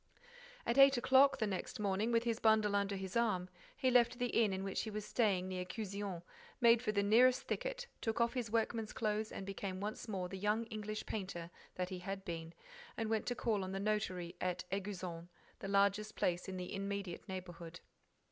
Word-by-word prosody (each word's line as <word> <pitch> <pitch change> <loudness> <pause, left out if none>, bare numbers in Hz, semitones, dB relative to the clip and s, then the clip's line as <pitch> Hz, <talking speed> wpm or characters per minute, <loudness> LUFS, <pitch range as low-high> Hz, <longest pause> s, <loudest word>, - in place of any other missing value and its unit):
At 240 +4 +2
eight 275 -1 +8
o'clock 270 +2 +5
the 225 - +1
next 195 0 -4
morning, 205 +3 0
with 230 0 +3
his 230 -1 -1
bundle 215 -2 +4
under 200 0 +1
his 190 -1 -5
arm, 210 -6 +1 0.3
he 260 -3 +2
left 245 0 +4
the 245 0 0
inn 225 -4 +3
in 190 0 -2
which 195 -1 -1
he 220 - -4
was 210 -1 -4
staying 200 -5 +1
near 185 -1 -3
Cuzion, 200 -2 -4 0.4
made 235 -1 +6
for 245 - 0
the 200 -1 +1
nearest 245 +5 +5
thicket, - - -3 0.2
took 225 -1 -1
off 235 0 +2
his 245 -4 -2
workman's 225 0 0
clothes, 215 0 -1
became 195 -1 -4
once 210 +4 -4
more 190 -4 -2
the 190 +1 -7
young 210 +3 +1
English 215 0 -4
painter 175 -5 -5 0.2
that 180 0 -2
he 185 -2 -5
had 195 +1 -5
been 165 -1 -5 0.4
and 225 -1 -1
went 220 -1 0
to 245 - 0
call 215 -5 0
on 185 0 -4
the 195 - -2
notary 195 -4 -1
at 180 -1 -1
Éguzon, 185 -4 -4 0.3
the - - -5
largest 200 +2 +2
place 175 +1 0
in 185 - -4
the 180 -1 -5
immediate 200 -2 -4
neighborhood. 175 -2 -7
205 Hz, 195 wpm, -36 LUFS, 185-225 Hz, 0.4 s, eight